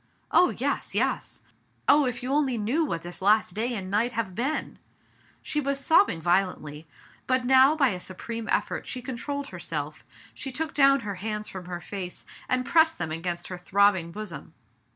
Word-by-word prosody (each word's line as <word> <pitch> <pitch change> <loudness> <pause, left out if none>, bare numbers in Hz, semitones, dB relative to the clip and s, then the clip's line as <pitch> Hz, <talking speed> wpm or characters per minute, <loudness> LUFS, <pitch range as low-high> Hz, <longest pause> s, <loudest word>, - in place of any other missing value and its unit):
"Oh, 360 - +6
yes, - - -2
yes! - - -1 0.4
Oh, 290 -2 +6
if 245 0 -4
you 260 +2 -1
only 275 -4 +2
knew 235 +10 +1
what 170 - -3
this 175 +1 -8
last 210 -1 +3
day 235 +4 -1
and 190 -2 -5
night 230 +4 +1
have 220 -5 -2
been 265 +10 -2 0.3
!*' - - -33
She 300 - -1
was 275 0 -1
sobbing 320 - +4
violently, 165 -3 0 0.4
but 255 -1 +1
now, 265 +3 +6
by 280 -4 +4
a 185 - -3
supreme 225 +5 -6
effort, - - -1
she 255 - -4
con 255 -1 -4
trolled 285 +3 -4
herself; - - -5 0.3
she 270 - -6
took 310 +4 -3
down 275 -1 +5
her 205 -2 -4
hands 210 0 -3
from 185 -2 -8
her 175 -1 -6
face, 185 -2 -6 0.2
and 255 0 +1
pressed 320 +2 +4
them 165 -2 -3
against 175 +2 -3
her 180 -1 -6
throbbing 190 -2 +2
bosom. 195 -5 -7
225 Hz, 185 wpm, -27 LUFS, 185-270 Hz, 0.4 s, Oh